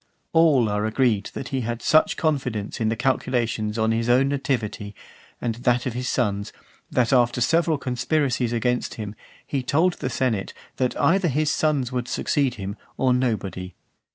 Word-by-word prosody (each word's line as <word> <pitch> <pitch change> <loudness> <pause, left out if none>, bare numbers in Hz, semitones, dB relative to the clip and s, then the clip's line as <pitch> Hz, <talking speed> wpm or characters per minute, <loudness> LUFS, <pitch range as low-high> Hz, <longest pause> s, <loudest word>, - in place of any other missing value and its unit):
XXV. - - -44
All 155 -8 +5
are 105 0 -1
agreed 110 -3 +1
that 125 - -5
he 135 -1 -1
had 120 0 -4
such 155 - +4
confidence 125 -9 -1
in 110 - +2
the 115 - 0
calculations 115 -3 0
on 110 0 +2
his 115 +1 0
own 130 +3 +4
nativity 125 -7 -2 0.4
and 120 -2 -1
that 120 +1 +1
of 125 - -2
his 125 +1 -3
sons, 100 -5 -1 0.4
that, 125 0 +1
after 120 -1 +3
several 165 +5 +2
conspiracies 130 -1 0
against 125 +1 -1
him, 105 -2 -6 0.3
he 140 - -2
told 160 +8 +2
the - - -4
senate, 115 -7 -1 0.2
that 130 -1 -1
either 185 +1 +3
his 150 +1 +1
sons 145 -5 +1
would 125 -1 -2
succeed 135 -1 0
him, 100 0 -6 0.2
or 130 -1 +3
nobody. 100 -8 -2
125 Hz, 170 wpm, -24 LUFS, 110-135 Hz, 0.4 s, All